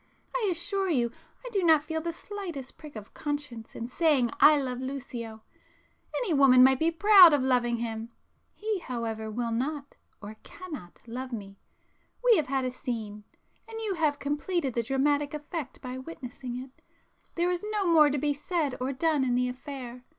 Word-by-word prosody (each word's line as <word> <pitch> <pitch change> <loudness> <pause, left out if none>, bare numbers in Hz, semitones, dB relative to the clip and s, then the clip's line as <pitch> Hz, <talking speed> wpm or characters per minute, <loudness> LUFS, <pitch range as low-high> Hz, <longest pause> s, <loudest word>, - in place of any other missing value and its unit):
I 450 -5 +1
assure 380 +3 -1
you 240 -7 +1 0.3
I - - -4
do 400 -4 +1
not 320 -3 +5
feel 320 +1 -3
the 335 +1 -2
slightest 345 -7 -7
prick 300 -4 -12
of 215 -1 -9
conscience 290 -6 -5
in 230 - -4
saying 265 -3 +2
I 300 0 +7
love 255 -2 -3
Lucio,—any 260 - -7
woman 265 -3 +7
might 265 0 +5
be 320 - +3
proud 370 -1 +8
of 285 -3 +2
loving 245 -2 +2
him;—he, 235 - -6
however, 225 -6 -4
will 230 +2 -2
not, 280 +4 -3 0.2
or 215 +1 -9
cannot 300 - -10
love 255 +3 -6
me,—we 220 - -3
have 310 -7 +1
had 265 -1 0
a 255 - -1
'scene,' 220 -5 -5 0.4
and 450 0 -7
you 435 -3 -1
have 310 -4 +1
completed 290 0 -2
the 235 - +1
dramatic 285 +4 +1
effect 300 -1 -6
by 255 -1 -6
witnessing 260 -3 -7
it,—there 270 +6 -6
is 355 +2 -2
no 415 -2 0
more 320 -4 +6
to 290 - -1
be 290 +1 +1
said 295 -2 -2
or 260 +2 -1
done 300 0 +1
in 250 -2 +1
the 250 0 +2
affair. 250 -1 -8
275 Hz, 165 wpm, -28 LUFS, 245-325 Hz, 0.4 s, proud